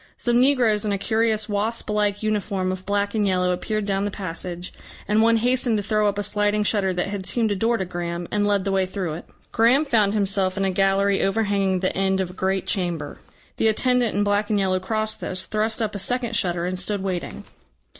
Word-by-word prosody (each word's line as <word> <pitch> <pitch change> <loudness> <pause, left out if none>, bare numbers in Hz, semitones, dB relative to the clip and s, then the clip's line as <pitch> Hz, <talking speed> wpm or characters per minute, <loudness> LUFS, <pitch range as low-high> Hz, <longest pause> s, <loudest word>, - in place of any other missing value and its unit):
Some 240 0 +1
negroes 245 -6 +3
in 210 - -1
a 200 - 0
curious 220 +1 +1
wasp 215 +2 -2
like 210 0 0
uniform 200 -3 -1
of 185 +1 -7
black 200 0 0
and 210 -2 +1
yellow 180 -1 +1
appeared 215 +3 -2
down 195 -1 0
the 205 - -1
passage, 180 -2 -6 0.3
and 210 +1 +3
one 230 0 +4
hastened 245 -1 +1
to 205 - -2
throw 215 0 +1
up 205 0 -1
a 205 - -1
sliding 210 0 +1
shutter 205 -2 +1
that 180 +1 -2
had 195 -2 -4
seemed 225 -3 +1
a - - +1
door 230 +4 +1
to 190 - -2
Graham, 175 -1 -4
and 205 0 +1
led 200 -2 +1
the 195 - 0
way 190 -1 +1
through 185 -4 -3
it. 165 - -8 0.3
Graham 245 +7 +4
found 215 -6 +2
himself 195 -2 0
in 195 - +1
a 190 - +1
gallery 195 +1 +2
overhanging 195 -2 +1
the 185 - -1
end 190 0 +1
of 185 -2 -2
a - - -13
great 190 0 -1
chamber. 175 -6 -2 0.4
The 225 - +2
attendant 245 +1 +2
in 205 - +2
black 205 +1 +1
and 210 - +2
yellow 190 -2 +1
crossed 215 +3 -3
this, 185 0 -4
thrust 220 +1 -1
up 215 - -2
a 200 - -4
second 240 +2 -1
shutter 175 -3 0
and 180 0 -3
stood 195 +1 -2
waiting. 185 -3 -4
205 Hz, 225 wpm, -23 LUFS, 190-215 Hz, 0.4 s, one